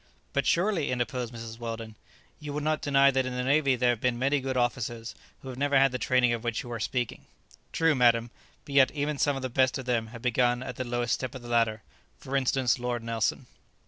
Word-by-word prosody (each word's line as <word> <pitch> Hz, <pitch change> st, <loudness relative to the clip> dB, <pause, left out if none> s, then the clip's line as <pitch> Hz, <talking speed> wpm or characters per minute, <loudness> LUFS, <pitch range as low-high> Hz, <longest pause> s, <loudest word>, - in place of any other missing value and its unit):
"But 140 Hz, -, 0 dB
surely," 175 Hz, -4 st, +1 dB
interposed 125 Hz, -1 st, -2 dB
Mrs. 115 Hz, -1 st, -8 dB
Weldon, 115 Hz, -1 st, -5 dB, 0.5 s
"you 150 Hz, -1 st, -6 dB
would 150 Hz, 0 st, -3 dB
not 155 Hz, 0 st, 0 dB
deny 140 Hz, -1 st, +4 dB
that 135 Hz, 0 st, +1 dB
in 125 Hz, -, -4 dB
the 125 Hz, -, -1 dB
navy 140 Hz, 0 st, +3 dB
there 125 Hz, 0 st, +3 dB
have 120 Hz, -, -4 dB
been 125 Hz, -2 st, +1 dB
many 135 Hz, +3 st, +1 dB
good 130 Hz, 0 st, -2 dB
officers 120 Hz, -2 st, -2 dB, 0.3 s
who 135 Hz, -, -7 dB
have 130 Hz, 0 st, -7 dB
never 140 Hz, 0 st, +2 dB
had 135 Hz, 0 st, +5 dB
the 125 Hz, -, -3 dB
training 125 Hz, 0 st, +3 dB
of 115 Hz, -1 st, -4 dB
which 120 Hz, -2 st, -2 dB
you 120 Hz, -, -9 dB
are 115 Hz, -, -4 dB
speaking?" 120 Hz, +1 st, -3 dB, 0.4 s
"True, 165 Hz, -1 st, +3 dB
madam; 120 Hz, -3 st, +3 dB, 0.3 s
but 140 Hz, -, -8 dB
yet 135 Hz, -2 st, +6 dB
even 145 Hz, -1 st, -2 dB
some 145 Hz, -1 st, +2 dB
of 135 Hz, -, -5 dB
the -, -, 0 dB
best 130 Hz, +1 st, +2 dB
of 130 Hz, -, -7 dB
them 115 Hz, -3 st, 0 dB
have 115 Hz, 0 st, -11 dB
begun 125 Hz, 0 st, +2 dB
at 125 Hz, -2 st, -7 dB
the 130 Hz, -, -2 dB
lowest 120 Hz, -1 st, -1 dB
step 130 Hz, -1 st, -3 dB
of 130 Hz, -, -8 dB
the -, -, -9 dB
ladder. 115 Hz, -2 st, +1 dB, 0.3 s
For 135 Hz, -, -6 dB
instance, 130 Hz, -3 st, +1 dB
Lord 120 Hz, -1 st, -3 dB
Nelson." 115 Hz, -1 st, -1 dB
125 Hz, 235 wpm, -28 LUFS, 120-135 Hz, 0.5 s, yet